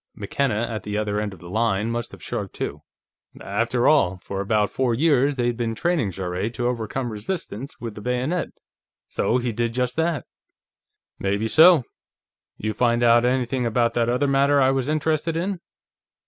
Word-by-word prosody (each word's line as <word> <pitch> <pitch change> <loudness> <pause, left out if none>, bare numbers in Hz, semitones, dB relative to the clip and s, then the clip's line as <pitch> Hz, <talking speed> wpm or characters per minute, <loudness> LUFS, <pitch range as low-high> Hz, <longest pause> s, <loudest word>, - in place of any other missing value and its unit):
McKenna, 120 -6 -1
at 110 -2 -4
the 105 0 -4
other 105 -1 -1
end 105 -1 -2
of 95 - -11
the 85 - -10
line, 110 0 +1
must 120 0 -3
have - - -12
shrugged, - - -4
too. 75 +1 -4 0.6
"After 115 +5 0
all, 95 -12 +4
for 100 0 -4
about 105 +1 +1
four 125 -3 0
years, 140 0 +3
they'd 120 -2 0
been 115 -2 -2
training 170 - 0
Jarrett 95 +4 -3
to 120 - -2
overcome 120 +1 -2
resistance 120 - -5
with 115 -3 -5
the 105 - -9
bayonet, 125 +9 -1 0.6
so 120 - 0
he 120 -1 -1
did 115 +1 -2
just 125 -1 0
that." 165 -3 0 0.9
"Maybe 100 +3 0
so. 160 +3 +7 0.7
You 110 0 -2
find 120 +2 +2
out 120 0 +5
anything 125 0 0
about 115 +1 +1
that 120 0 +1
other 125 +4 +1
matter 140 +1 +3
I 130 -1 +4
was 135 0 -1
interested 155 +1 0
in?" 185 +2 -2
120 Hz, 175 wpm, -23 LUFS, 110-135 Hz, 0.9 s, so